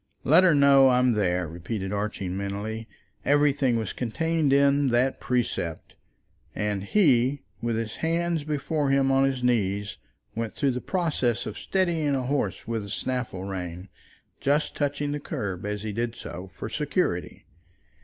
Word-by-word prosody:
"Let 185 - +6
her 175 -4 +5
know 140 -1 +6
that 130 - +5
I'm 125 0 +4
there," 90 -5 +1
repeated 95 +4 -4
Archie, 100 -2 -3
mentally. 100 +4 -4 0.4
Everything 145 -3 +3
was 110 -4 -3
contained 160 +5 0
in 140 0 +4
that 125 +2 +1
precept. 120 -10 -2 0.6
And 105 -2 -1
he, 135 - +3 0.2
with 115 -1 -1
his 110 -1 -3
hands 165 -1 0
before 150 0 -1
him 135 0 +3
on 135 0 +4
his 130 -2 -1
knees, 100 -4 0 0.4
went 115 -1 -4
through 140 -2 +1
the 125 0 -3
process 155 - 0
of 110 - -5
steadying 165 -7 0
a 130 - -1
horse 125 - -2
with 115 -1 -1
the 100 - -8
snaffle 120 -6 -3
rein, 90 -1 -6 0.5
just 145 +2 +1
touching 145 0 -1
the 150 - -2
curb, 100 -8 -4
as 105 0 -3
he 110 - -3
did 115 +2 -2
so, 95 +1 -8
for - - -5
security. - - -2
125 Hz, 155 wpm, -26 LUFS, 105-145 Hz, 0.6 s, Let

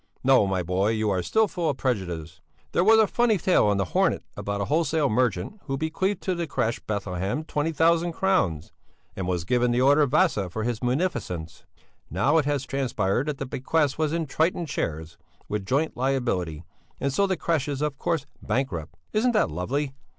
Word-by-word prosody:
No, 130 -6 +5
my 95 -2 0
boy, 90 +4 +1
you 110 -1 0
are 95 -2 +1
still 220 - +2
full 175 -5 -2
of 140 - -2
prejudices! 85 - -3 0.3
There 175 - +2
was 220 +3 +6
a 220 - +6
funny 230 0 +2
tale 175 - +3
in 100 - +1
the 100 - +1
Hornet - - +2
about 100 0 -3
a 100 - -1
wholesale 155 -1 +1
merchant, 115 - 0
who 135 -2 -2
bequeathed 170 +6 -1
to 185 - 0
the 170 -2 -3
crèche 115 -4 -1
Bethlehem 100 - -2
twenty 155 0 -1
thousand 165 +2 +2
crowns, 160 - 0 0.4
and 95 -2 -3
was 90 -2 -1
given 125 +5 +2
the 120 +1 +2
order 140 +3 +5
of 145 - +3
Vasa 140 - +2
for 110 +5 -4
his 120 -1 -2
munificence; 120 - -2 0.4
now 135 - +3
it 150 - 0
has 145 -2 -1
transpired 125 -3 -1
that 150 -2 -2
the 135 - -4
bequest 140 +3 0
was 155 -1 +1
in 165 0 -1
'Triton' 165 +4 0
shares 80 - -4 0.3
with 105 -2 -3
joint 145 +7 0
liability, 120 - -1 0.4
and 140 0 -1
so 200 +7 +2
the 190 -2 0
crèche 160 -4 0
is 145 0 -2
of 150 -2 -2
course 160 -4 -1 0.2
bankrupt. 90 - -2 0.2
Isn't 235 +3 +2
that 210 - +2
lovely? 135 - -2
135 Hz, 195 wpm, -25 LUFS, 100-160 Hz, 0.4 s, was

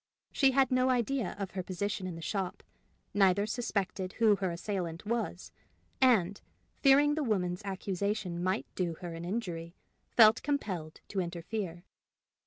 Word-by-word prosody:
She 270 - +4
had 265 -1 +3
no 255 0 +3
idea 250 -3 0
of 195 -2 -4
her 190 - -3
position 185 +1 -3
in 180 - -5
the 165 - -8
shop, 190 0 -3 0.5
neither 200 0 +4
suspected 200 -5 -2
who 220 -3 +4
her 190 -2 -1
assailant 175 0 -4
was, 220 -5 -2 0.5
and, 205 -7 +4 0.4
fearing 285 +1 +6
the 310 - -1
woman's 180 -7 0
accusation 195 -1 -2
might 185 +4 0
do 175 -3 -1
her 175 -2 -5
an 165 +1 -6
injury, 175 -4 -4 0.3
felt 220 -1 +6
compelled 185 - -3
to 200 - -2
interfere. 175 0 -4
195 Hz, 145 wpm, -31 LUFS, 180-225 Hz, 0.5 s, fearing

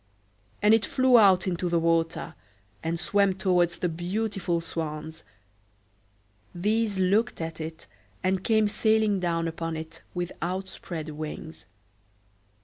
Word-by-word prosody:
And 210 +1 +6
it 225 -1 +4
flew 255 -2 +4
out 190 -4 +5
into 180 -1 -1
the 170 - +2
water, 165 0 0 0.5
and 165 +1 -2
swam 200 +1 +2
towards 180 -2 +2
the 180 - 0
beautiful 180 +1 -2
swans: 160 -1 -5 1.3
these 210 +3 0
looked 200 +6 +2
at 165 -1 -5
it, 160 0 -7 0.4
and 185 0 +1
came 220 -1 +3
sailing 215 -1 +2
down 170 -2 0
upon 165 0 -4
it 160 +1 -8
with 175 0 -2
outspread 175 -3 -4
wings. 155 +1 -7
175 Hz, 125 wpm, -27 LUFS, 165-200 Hz, 1.3 s, And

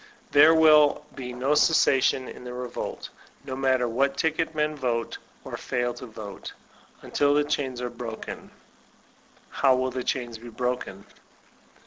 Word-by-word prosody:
There 155 +3 +7
will 150 -2 +5
be 125 -2 -6
no 130 +4 0
cessation 135 -4 +3
in - - -10
that 125 0 -7
re 125 0 -4
volt, - - -6 0.4
no 130 -2 -5
matter 130 -2 +1
what 135 +4 0
ticket 160 +1 0
men 150 0 0
vote 120 -4 -2 0.2
or - - -6
fail 120 -1 -2
to 125 - -9
vote, 110 -3 -9 0.5
until 145 0 +1
the 150 - +3
chains 130 -4 -2
are 125 - -3
broken. 115 -2 -7 1.0
How 135 -2 +3
will 130 0 -1
the 125 0 -4
chains 120 -4 -3
be 120 +1 -10
broken 120 -5 -4
130 Hz, 150 wpm, -26 LUFS, 120-145 Hz, 1.0 s, There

